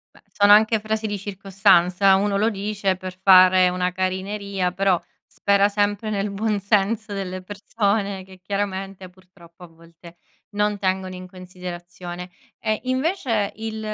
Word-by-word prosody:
Beh, - - -19
sono 205 0 +5
anche 220 +1 +4
frasi 215 +1 -2
di 205 -1 -3
circostanza, 195 -1 +2
uno 200 +1 +1
lo 220 +3 +2
dice 200 -1 -2
per 185 0 -8
fare 185 -1 +6
una 180 0 -1
carineria, 190 0 -2
però 185 -2 +1 0.2
spera 200 0 +2
sempre 205 +1 -1
nel 205 0 -1
buon 210 +1 -1
senso 210 +2 0
delle 185 -2 -5
persone 200 0 -2
che, 190 0 -16
chiaramente, 195 -1 -4
purtroppo 180 -2 -19
a 175 - -10
volte 165 +1 -17 0.3
non 210 0 0
tengono 185 -1 -2
in 185 - -9
considerazione. 180 -1 -9 0.3
E 215 -1 -1
invece 255 - -1
il 220 0 -5
195 Hz, 140 wpm, -22 LUFS, 185-205 Hz, 0.3 s, fare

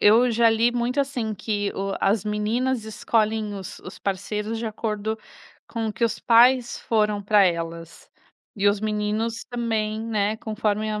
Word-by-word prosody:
eu 230 +4 +6
já 230 0 +4
li 225 +2 +3
muito, 245 +2 -1
assim, 255 -6 -1
que 205 0 -2
o 195 0 -2
as 200 +1 +2
meninas 220 +4 0
escolhem 220 -1 0
os 190 -2 -7
os 180 - -10
parceiros 210 +3 -3
de 230 - -4
acordo 220 0 -3 0.5
com 225 -1 -3
o - - -3
que 235 - -7
os 230 -1 +1
pais 240 +1 +4
foram 210 -2 +1
para 205 0 +5
elas 165 -1 -3 0.5
e 200 0 +1
os 200 0 +3
meninos 215 +2 -1
também, 220 -3 -1
né, 215 -1 0
conforme 215 -1 -1
a 210 0 -2
215 Hz, 165 wpm, -24 LUFS, 205-230 Hz, 0.5 s, eu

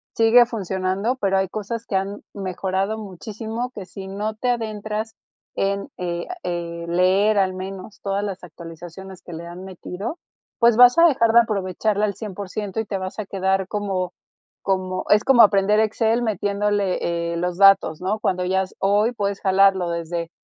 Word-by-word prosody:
sigue 230 +2 +6
funcionando, 195 0 -2
pero 195 -5 +1
hay 190 -1 0
cosas 215 +3 -5
que 195 - -4
han, 195 +2 -2
mejorado 190 +2 -2
muchísimo, 220 +4 -6
que 200 -6 -8
si 190 +1 -9
no 210 +3 -3
te 250 +3 -2
adentras 220 -1 -3 0.4
en, 200 0 -1
eh 175 -1 -3 0.2
eh, 170 -1 -4
leer 190 +5 +3
al 190 -1 +2
menos 190 +2 -8
todas 200 0 -1
las 195 -2 -5
actualizaciones 175 +3 -10
que 175 - -10
le 170 +1 -7
han 175 +2 -9
metido, 190 - -6 0.4
pues 235 -2 +5
vas 245 +2 +8
a 335 - +8
dejar 230 -7 +2
de 235 - +8
aprovecharla 210 -1 0
al 200 -2 -2
cien 210 -1 -7
por 200 -1 -6
ciento 205 0 -4
y 220 - -1
te 200 -1 -3
vas 185 +1 -6
a 215 - -3
quedar 190 0 0
como 190 -3 -2 0.5
como 185 -1 -1
es 210 +1 +5
como 265 -3 +6
aprender 205 0 +5
Excel 220 +2 +1
metiéndole, 200 -5 -1
eh, - - -3
los 175 +1 -2
datos, 195 -5 +5
¿no? 200 +4 -1
Cuando 185 -3 0
ya 190 +1 +1
s 185 - -11
hoy 205 +4 +2
puedes 200 -3 -2
jalarlo 190 -2 +3
desde 170 0 -3
195 Hz, 175 wpm, -22 LUFS, 185-215 Hz, 0.5 s, vas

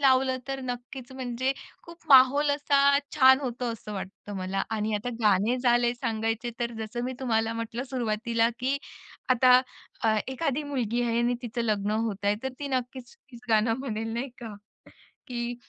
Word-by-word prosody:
लावलं 260 -1 +3
तर 270 0 -3
नक्कीच 245 +1 -6
म्हणजे 260 0 -2 0.3
खूप 335 0 -14
माहोल 275 +2 +7
असा 280 -1 +4 0.2
छान 265 -1 +7
होतो 250 -2 -4
असं 210 -1 -8
वाटतं 200 +1 -7
मला. 190 +1 -2
आणि 215 -1 -1
आता 210 +4 -2
गाणे 210 +3 +3
झाले 240 -1 +3
सांगायचे 225 -1 -2
तर 235 0 -1
जसं 225 +2 -4
मी 255 - -2
तुम्हाला 225 -3 +1
म्हटलं 230 +2 -4
सुरुवातीला 230 -2 0
की 265 +3 0 0.5
आता 255 0 +6 0.4
अ, 220 -1 +3
एखादी 275 +2 -1
मुलगी 245 -5 -1
आहे 235 -1 0
आणि 240 +1 +2
तिचं 235 0 -3
लग्न 210 -2 0
होत 215 -2 -2
आहे, 205 +1 +3
तर 265 - -1
ती 285 - -4
नक्कीच 255 -1 -4
तीच 245 -3 -16
गाणं 225 +1 +3
म्हणेल 225 -4 -3
नाही 245 +4 -2
का 225 -4 -7 0.7
की 240 -1 -3
240 Hz, 165 wpm, -27 LUFS, 225-260 Hz, 0.7 s, माहोल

